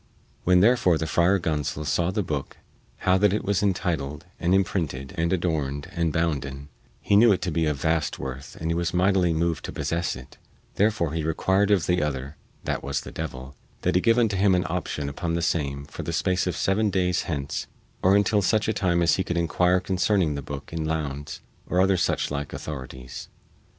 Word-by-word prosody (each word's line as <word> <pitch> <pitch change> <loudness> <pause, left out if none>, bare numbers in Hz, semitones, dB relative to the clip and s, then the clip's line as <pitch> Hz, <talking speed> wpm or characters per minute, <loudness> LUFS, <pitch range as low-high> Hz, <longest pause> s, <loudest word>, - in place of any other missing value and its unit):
When 90 0 +5
therefore 105 -6 +4
the 80 - -2
Friar 85 +4 +3
Gonsol 75 -3 -2
saw 85 +4 +1
the 105 +2 -1
booke 75 -5 -4 0.5
how 95 +1 +4
that 105 -1 +4
it 105 - -1
was 100 -1 +1
intituled 85 -7 -1
and 90 +2 +2
imprinted 80 -8 -1
and 85 +1 0
adorned 80 -4 -1
and 85 -4 0
bounden, 70 -3 -2 0.3
he 100 - +1
knew 110 +2 +7
it 95 - +2
to 90 - -1
be 80 0 +1
of 75 -3 -1
vast 80 0 0
worth 65 +1 -7
and 80 +1 -2
he - - +2
was 85 +1 -1
mightily 90 -1 +3
moved 80 0 0
to - - -5
possess 85 0 -2
it; 65 0 -13 0.3
therefore 100 -7 +1
he 80 - -1
required 95 +5 +1
of 100 -5 +3
the 90 0 +1
other 70 -1 -3 0.3
(that - - -2
was 70 +1 -2
the - - -9
devil) 65 -4 -6 0.3
that - - +2
he 90 - +3
give 115 +3 +3
unto 110 -5 +2
him 95 -1 +4
an 90 - +1
option 80 -4 -3
upon 85 +4 -2
the 85 - 0
same 70 -4 -1
for 75 - -8
the - - -4
space 90 0 +1
of 90 -5 -2
seven 105 +6 +2
days 90 -2 0
hence 70 -4 -3 0.3
or 95 +2 +5
until 100 +1 +3
such 110 +2 +2
a 110 - +1
time 90 -4 +1
as 85 - +3
he 95 - +1
could 85 -1 -3
inquire 90 +2 +2
concerning 95 -3 +1
the 70 - -4
booke 70 +3 -8
in 80 -1 -2
Lowndes 75 -3 -3 0.3
and 90 - +1
other 95 +1 +4
such 85 - 0
like 70 0 -4
authorities. 65 -4 -7
85 Hz, 205 wpm, -25 LUFS, 75-95 Hz, 0.5 s, knew